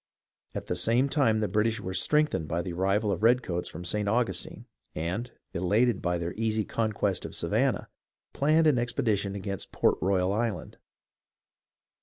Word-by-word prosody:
At - - -4
the - - -2
same 115 +9 +2
time 120 -7 +2
the 105 - +1
British 110 +3 +1
were 95 - -5
strengthened 150 - +1
by 85 +2 -1
the 90 -1 -5
arrival 100 +4 +1
of 90 - -1
the - - -9
redcoats 115 -7 +2
from 90 +3 -8
St. 105 +3 0
Augustine, 120 +2 -1 0.3
and, 90 +10 -3 0.2
elated 105 +5 +2
by 90 0 0
their 85 0 -3
easy 110 -1 0
conquest 105 -4 -1
of - - -7
Savannah, - - 0 0.5
planned 155 +3 +3
an 145 -6 +4
expedition 105 -4 0
against 100 -1 -5
Port - - +2
Royal 95 +1 +2
Island. 110 0 -2
105 Hz, 160 wpm, -28 LUFS, 90-115 Hz, 0.5 s, an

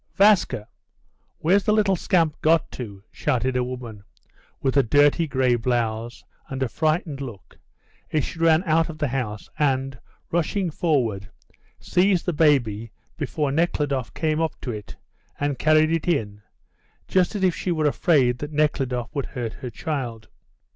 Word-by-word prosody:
"Vaska! 195 - +4 0.7
Where's 190 +5 +2
the - - +3
little 205 -3 +3
scamp 165 -4 +1
got 160 +1 +3
to?" 100 -6 -8
shouted 130 -2 -1
a 125 - +2
woman, 120 -5 -7 0.6
with 135 0 0
a 140 - +6
dirty 145 +6 +3
grey 130 -3 +2
blouse, 120 -1 -1 0.3
and 135 0 -2
a - - 0
frightened 155 - -1
look, 115 -8 -9 0.5
as 150 -4 +1
she 165 - -8
ran 165 +1 +4
out 165 -1 +2
of 160 - -7
the 150 -3 -1
house, 120 -5 -3
and, 135 -2 0 0.3
rushing 175 +2 0
forward, 120 - 0 0.5
seized 185 0 +2
the 175 - 0
baby 120 -8 +2 0.2
before 145 -1 -2
Nekhludoff 145 -5 0
came 155 0 0
up 160 -2 -2
to 125 - -3
it, 105 -2 -8 0.4
and 145 -2 -1
carried 155 +1 +4
it 165 0 -1
in, 105 -11 -1 0.7
just 185 +2 +2
as 200 - -2
if 185 -2 +4
she 180 - -3
were 155 -2 0
afraid 140 -5 +3
that 145 +3 -5
Nekhludoff 135 -5 0
would 140 -3 -2
hurt 120 -5 -5
her 125 - -4
child. 120 -6 -4
145 Hz, 155 wpm, -24 LUFS, 125-165 Hz, 0.7 s, a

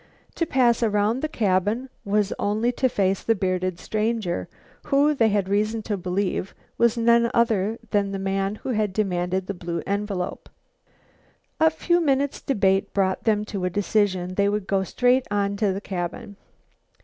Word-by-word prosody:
To 335 - -1
pass 245 -4 +3
around 215 +1 +1
the 310 - -2
cabin 210 - 0 0.2
was 205 0 +1
only 215 +4 +1
to 260 +1 +1
face 195 -4 0
the 225 - +1
bearded 185 -2 -1
stranger, 215 -2 -2 0.4
who, 290 +1 +3
they 230 -6 +3
had 200 -2 0
reason 215 +3 0
to 210 - -2
believe, 185 +1 -2 0.2
was 235 0 +3
none 235 0 +4
other 225 -2 +2
than 200 -1 +1
the 195 - -3
man 195 +1 -1
who 240 - -7
had 215 -5 0
demanded 185 -2 -1
the 200 - -4
blue 170 -2 -4
envelope. 200 -2 -3 1.1
A 320 - +6
few 345 +2 +1
minutes' 280 -2 0
debate 195 -5 +1
brought 190 -1 0
them 210 -2 +2
to 200 -3 -5
a - - +1
decision. 190 -2 0
They 200 +1 +2
would 205 -1 -2
go 195 0 +1
straight 250 +6 +2
on 200 -1 0
to 205 -2 +1
the 190 - -3
cabin. 195 +4 -5
205 Hz, 165 wpm, -24 LUFS, 190-230 Hz, 1.1 s, A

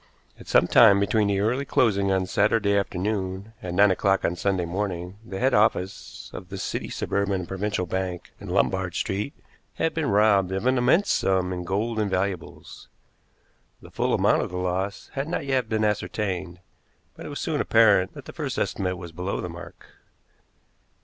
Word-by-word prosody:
At - - -13
some - - +4
time 100 +1 +6
between 105 +1 +2
the 100 -1 +1
early 125 +6 +1
closing 100 -8 +2
on 95 -1 +1
Saturday 105 +1 +2
afternoon 100 +1 -2
and 90 -1 -5
nine 100 0 +6
o'clock 95 +1 +1
on 85 - 0
Sunday 95 0 0
morning 90 0 -4
the 95 -3 -7
head 130 +5 +1
office 100 -2 0
of 90 - -9
the 95 - -6
City, - - -4
Suburban 100 0 -1
and 85 - -8
Provincial 95 -1 -2
Bank, 90 0 -4
in - - -9
Lombard 95 -2 0
Street, 100 +9 -2 0.4
had 165 - 0
been 160 -6 -1
robbed 100 -2 +3
of 95 +4 -2
an 130 0 +3
immense 135 +11 +3
sum 95 -1 +1
in 90 -1 -5
gold 110 +5 -1
and 105 -2 0
valuables. 95 -1 -4 0.9
The - - -15
full - - 0
amount - - +3
of - - -3
the 90 - -5
loss 90 +2 -3
had 135 +1 -3
not 160 - -3
yet 130 -4 0
been 110 -1 0
ascertained, 95 -4 -2 0.5
but - - -9
it - - -7
was - - -5
soon - - -1
apparent 105 -5 +4
that - - -10
the - - -10
first - - -4
estimate 90 -1 -1
was 85 -2 -9
below 90 +4 -3
the 90 - -4
mark. 85 +1 -11
100 Hz, 185 wpm, -25 LUFS, 90-105 Hz, 0.9 s, time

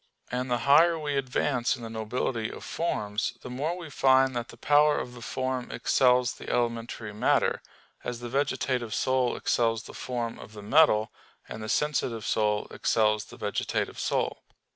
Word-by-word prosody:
And 125 +1 -2
the 120 - +2
higher 165 +4 +6
we 150 -2 -2
advance 130 -1 0
in 120 - -11
the - - -5
nobility 110 +1 -2
of - - -9
forms, 110 -8 -2
the 125 - -7
more 150 +8 -2
we 165 -4 -8
find 130 -1 +4
that 120 0 -2
the - - -13
power 150 +1 +4
of 125 - -4
the 120 - -11
form 130 +1 -3
excels 125 -1 +3
the - - -9
elementary 115 -2 -2
matter; 105 - +2 0.4
as 120 -1 -4
the 120 - -6
vegetative 125 -3 -1
soul 130 -2 +1
excels 115 -2 +1
the - - -11
form 120 -2 -4
of 105 - -11
the 105 -1 -9
metal, 110 -3 +4 0.4
and 110 - -7
the 110 - -5
sensitive 125 -6 0
soul 105 0 +1
excels 110 -2 +1
the - - -13
vegetative 105 -1 -2
soul. - - -1
125 Hz, 170 wpm, -28 LUFS, 115-135 Hz, 0.4 s, higher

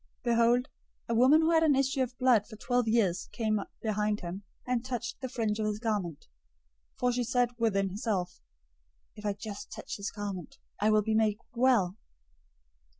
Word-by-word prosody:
009:020 - - -48
Behold, 235 +1 +3 0.4
a - - +1
woman 260 +7 +6
who 320 +1 +3
had 325 -1 +5
an 310 -3 +4
issue 270 0 +1
of 250 -1 -2
blood 245 -5 +4
for 220 - -10
twelve 245 +2 0
years 215 -6 +1
came 215 -2 0 0.2
behind 210 -1 0
him, 180 +3 -5 0.2
and 250 -2 0
touched 245 -1 -4
the 260 - -2
fringe{or, 225 -4 -1
tassel} - - 0
of - - +1
his 205 - -7
garment; 205 -9 -2 0.7
009:021 - - -32
for 250 0 +3
she 245 0 0
said 245 +1 +2
within 195 -4 +1
herself, 190 -3 -3 0.7
"If 210 0 -5
I 205 - +1
just 205 0 -8
touch - - -6
his 200 0 -3
garment, 200 -4 -6 0.2
I 210 - +3
will 215 -1 +4
be 220 +1 0
made 215 -1 +2 0.2
well." 235 -7 +3
220 Hz, 190 wpm, -30 LUFS, 205-245 Hz, 0.7 s, woman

